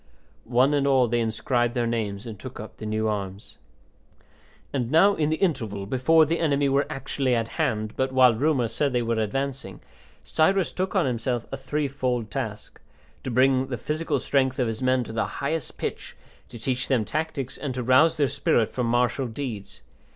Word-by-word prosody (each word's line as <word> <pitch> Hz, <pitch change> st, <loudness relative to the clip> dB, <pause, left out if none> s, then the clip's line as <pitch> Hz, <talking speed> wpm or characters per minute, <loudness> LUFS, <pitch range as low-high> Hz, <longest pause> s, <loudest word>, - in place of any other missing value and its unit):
One 130 Hz, +4 st, +4 dB
and 140 Hz, -1 st, +2 dB
all 130 Hz, -3 st, +4 dB
they 120 Hz, +1 st, 0 dB
inscribed 120 Hz, +2 st, 0 dB
their 120 Hz, -1 st, +1 dB
names 110 Hz, -2 st, -2 dB
and 110 Hz, -4 st, -8 dB
took 130 Hz, -1 st, -9 dB
up 110 Hz, -, -9 dB
the 110 Hz, -, -6 dB
new 110 Hz, +1 st, 0 dB
arms. 100 Hz, -2 st, -5 dB, 1.1 s
And 125 Hz, -4 st, -1 dB
now 180 Hz, +8 st, +5 dB
in 155 Hz, -5 st, 0 dB
the 160 Hz, -, +1 dB
interval, 115 Hz, -, -1 dB
before 155 Hz, +9 st, +4 dB
the 165 Hz, +3 st, -1 dB
enemy 145 Hz, -3 st, +2 dB
were 140 Hz, +1 st, +2 dB
actually 135 Hz, -1 st, -1 dB
at 115 Hz, -1 st, -1 dB
hand, 110 Hz, -2 st, -1 dB
but 130 Hz, 0 st, 0 dB
while 130 Hz, -2 st, +6 dB
rumour 130 Hz, 0 st, +1 dB
said 140 Hz, +4 st, -1 dB
they 120 Hz, -1 st, +1 dB
were 115 Hz, -1 st, 0 dB
advancing, 130 Hz, -1 st, -3 dB, 0.4 s
Cyrus 190 Hz, +4 st, +2 dB
took 185 Hz, +2 st, -2 dB
on 190 Hz, -, +3 dB
himself 120 Hz, -1 st, -1 dB
a -, -, -2 dB
three 145 Hz, +2 st, -2 dB
fold 125 Hz, -5 st, -2 dB
task: 110 Hz, -5 st, -5 dB, 0.4 s
to -, -, -5 dB
bring 130 Hz, +2 st, +3 dB
the 125 Hz, -2 st, -3 dB
physical 150 Hz, +3 st, -2 dB
strength 130 Hz, -1 st, +1 dB
of 125 Hz, -, +1 dB
his 115 Hz, +1 st, -4 dB
men 130 Hz, -1 st, +2 dB
to 110 Hz, -, -8 dB
the 115 Hz, -, 0 dB
highest 155 Hz, +1 st, -3 dB
pitch, -, -, -5 dB, 0.3 s
to 120 Hz, -, -9 dB
teach 130 Hz, +3 st, -2 dB
them 125 Hz, -5 st, +1 dB
tactics, 140 Hz, 0 st, -3 dB
and 135 Hz, -4 st, -4 dB
to 125 Hz, -, -2 dB
rouse 130 Hz, +7 st, +4 dB
their 145 Hz, -2 st, +3 dB
spirit 130 Hz, -5 st, +1 dB
for 125 Hz, -, -1 dB
martial 120 Hz, +2 st, +1 dB
deeds. 115 Hz, -4 st, -6 dB
130 Hz, 190 wpm, -25 LUFS, 115-140 Hz, 1.1 s, while